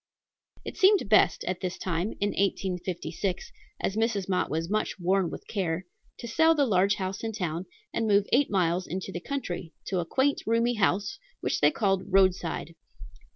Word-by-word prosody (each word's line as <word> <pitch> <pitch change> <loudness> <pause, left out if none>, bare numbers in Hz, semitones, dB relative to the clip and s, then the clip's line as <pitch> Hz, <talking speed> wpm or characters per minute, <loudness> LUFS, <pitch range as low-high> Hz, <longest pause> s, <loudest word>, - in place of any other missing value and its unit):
It - - -6
seemed 385 - +5
best 215 - +4
at 185 0 -3
this 185 0 -3
time, 180 +3 -2
in 205 - +1
1856, 185 -2 -2 0.3
as 195 - -1
Mrs. 220 -4 0
Mott 185 -2 0
was 160 +2 -2
much 215 +1 -1
worn 185 0 +2
with - - -9
care, 180 -3 -2 0.3
to 235 - -7
sell 320 +7 +4
the 285 -2 +3
large 200 -3 +3
house 190 +1 -4
in 225 0 -2
town 175 -3 -3 0.3
and 225 - 0
move 200 -1 +4
eight 275 +3 +4
miles 180 -2 +1
into 190 +1 -4
the 175 - -4
country, 175 - -4 0.2
to 185 - 0
a 170 - -1
quaint, 270 +10 +1
roomy 230 +2 +2
house 205 +3 0 0.2
which - - -1
they - - +6
called 195 -8 +1
Roadside. 185 -4 +1
195 Hz, 175 wpm, -28 LUFS, 180-220 Hz, 0.3 s, they